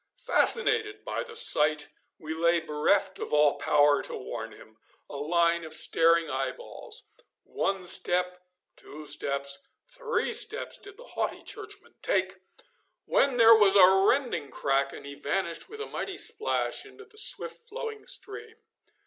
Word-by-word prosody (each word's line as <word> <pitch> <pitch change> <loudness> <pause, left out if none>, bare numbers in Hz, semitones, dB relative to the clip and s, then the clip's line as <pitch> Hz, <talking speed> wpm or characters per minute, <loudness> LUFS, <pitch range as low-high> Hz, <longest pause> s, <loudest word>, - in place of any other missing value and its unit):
Fascinated 435 -3 +2
by - - -3
the 470 -2 -9
sight, 155 - +3 0.3
we 160 0 -6
lay 170 +1 +2
bereft 190 +6 0
of - - -6
all 150 -1 +3
power 145 -1 +3
to - - 0
warn 115 -3 -7
him 110 0 -17 0.3
a - - -10
line 170 +3 +1
of 160 0 -3
staring 165 +1 +4
eyeballs. 130 - -5 0.4
One 195 -2 -3
step, 180 0 +1 0.4
two 150 +1 -11
steps, 140 -1 -1 0.3
three 475 -2 -3
steps 440 -1 +1
did 400 0 -13
the - - -13
haughty - - -3
Churchman 420 -1 -9
take, 190 0 0 0.7
when 275 -3 +1
there 230 -1 +8
was 205 -3 +4
a 185 -2 +8 0.2
rending 240 - -1
crack, 135 0 -1
and - - -11
he 140 - -8
vanished 170 +4 -3
with 440 - -10
a 435 - -4
mighty 390 -1 -6
splash 440 - -1
into 425 - -15
the 430 0 -6
swift 470 0 -1
flowing 450 -1 -7
stream. 445 +2 -6
180 Hz, 150 wpm, -27 LUFS, -, 0.7 s, there